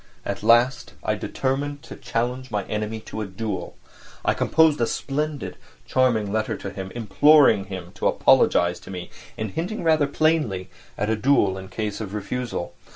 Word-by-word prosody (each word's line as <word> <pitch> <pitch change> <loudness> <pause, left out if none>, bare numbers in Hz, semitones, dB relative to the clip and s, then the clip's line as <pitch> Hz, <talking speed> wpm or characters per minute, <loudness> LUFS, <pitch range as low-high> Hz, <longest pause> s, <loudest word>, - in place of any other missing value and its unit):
At 100 - -3
last 120 +4 +3
I - - +1
determined 140 +2 -2
to - - -9
challenge 125 +2 -3
my 105 -3 -1
enemy 105 +2 -3
to 110 - -6
a 105 - -3
duel. 100 +1 -5 0.5
I - - +3
composed 160 -5 +3
a 115 - +3
splendid, 150 +1 -3 0.3
charming 115 -6 +2
letter 110 0 -1
to 100 - -6
him, 95 -1 -6
imploring 120 0 +5
him 95 -3 -7
to - - -1
apologise 90 0 +3
to - - -13
me, 90 -2 -7 0.3
and 110 -2 -3
hinting 180 - -3
rather 155 -3 +3
plainly 145 - 0 0.3
at 105 +2 0
a - - +2
duel 105 -5 +3
in 95 0 -8
case 105 -1 -4
of 105 -1 -5
refusal. 105 -2 -4
110 Hz, 165 wpm, -24 LUFS, 100-140 Hz, 0.5 s, imploring